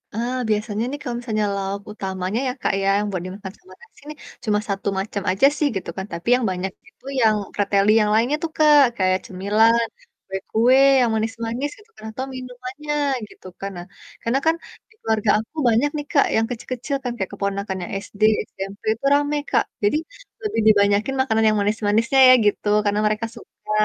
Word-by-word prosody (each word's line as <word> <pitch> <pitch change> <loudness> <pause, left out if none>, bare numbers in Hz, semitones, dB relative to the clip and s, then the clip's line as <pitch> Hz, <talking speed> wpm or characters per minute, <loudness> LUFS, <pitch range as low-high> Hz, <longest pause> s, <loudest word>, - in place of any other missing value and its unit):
Ah, 240 +3 -2
biasanya 215 0 -1
nih 285 - -4
kalau 245 -4 -4
misalnya 215 -3 -1
lauk 195 0 -3
utamanya 190 +1 -3
ya, - - 0
Kak, - - +1
ya 195 - 0 0.2
buat 185 -3 -3
dimakan 190 +1 -8
sama 370 - -17
nasi 475 - -19
nih, 300 - -8 0.3
cuma 210 -2 +2
1 195 0 -3
macam 200 0 -4
aja 195 +8 +3
sih, 300 - +2
gitu 190 - -4
kan, 190 - -3
tapi 170 +4 -7
yang 250 -2 -1
banyak 185 +1 -3 0.2
itu - - -30 0.2
yang 220 -2 +4 0.2
preteli 200 0 +2
yang 210 - +1
lainnya 235 +7 +2
tuh, 330 - -2
Kak, 300 -1 +6 0.2
kayak 185 -1 +2
cemilan, 220 +5 +2 0.4
kue-kue 220 +6 +2 0.2
yang 245 -2 +3
manis-manis 230 +5 -2
gitu 420 +1 -20
kan - - -14
atau 255 +4 -5
minumannya 255 +3 -6 0.4
gitu - - -19
kan, 195 - -4
nah, 175 - -7 0.4
karena 240 +4 0
kan 320 0 +4 0.3
di - - -24
keluarga 220 -1 0
aku 220 +8 -10
banyak 235 +6 +2
nih, 295 - -4
Kak, 280 - +4
yang 225 0 +2
kecil-kecil 255 +3 -4
kan, 250 - -2
kayak 190 -4 -3
keponakan 200 -1 -3
yang - - -7
SD, 200 - -16 0.3
SMP 195 +1 -8
itu 230 - -9
rame, 290 +1 +2
Kak, - - +3 0.2
jadi 205 +8 +3 0.5
lebih 415 - -1
dibanyakin 205 +3 +3
makanan 225 -4 +1
yang 215 0 +3
manis-manisnya 215 +5 +1
ya - - +10
gitu, 205 0 +1 0.2
karena 205 0 +1
mereka 215 +2 -1
suka. - - -11
220 Hz, 185 wpm, -22 LUFS, 200-255 Hz, 0.5 s, ya